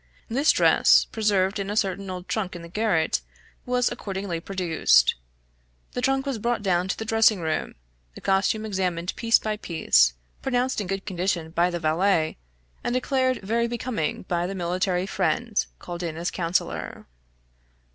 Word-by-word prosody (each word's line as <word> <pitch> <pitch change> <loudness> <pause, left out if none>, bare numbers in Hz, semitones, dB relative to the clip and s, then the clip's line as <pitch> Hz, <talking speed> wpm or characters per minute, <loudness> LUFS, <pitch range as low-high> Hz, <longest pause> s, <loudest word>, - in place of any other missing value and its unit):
This 275 +7 +3
dress, - - +5
preserved 205 -2 +1
in 195 0 -3
a 205 - -2
certain 195 -1 -1
old 180 0 -6
trunk 195 -5 -2
in 170 - -8
the - - -8
garret, 170 - +1 0.5
was 250 0 +1
accordingly 195 -6 -4
produced. 165 - +3 0.8
The 245 - -3
trunk 270 +1 +1
was 270 -5 -2
brought 235 -1 -1
down 180 -2 +1
to 190 - -2
the 220 - -5
dressing 225 -2 +4
room, 160 -2 -2 0.4
the - - -10
costume 195 +3 +1
examined 185 -4 -2
piece 230 0 +4
by 215 -1 -3
piece, 65 - +3 0.3
pronounced 255 -2 0
in 200 - -5
good 195 +1 -3
condition 175 -4 -2
by 170 +2 +2
the 175 -1 -3
valet, 160 +1 +1 0.5
and 240 - -1
declared 255 -2 0
very 230 +4 +1
becoming 235 -8 -3
by 175 -1 -1
the 195 - -5
military 180 +1 0
friend 195 +4 0
called 175 0 -7
in 165 -2 -4
as 170 +1 -2
counsellor. 170 0 -2
195 Hz, 160 wpm, -25 LUFS, 175-225 Hz, 0.8 s, dress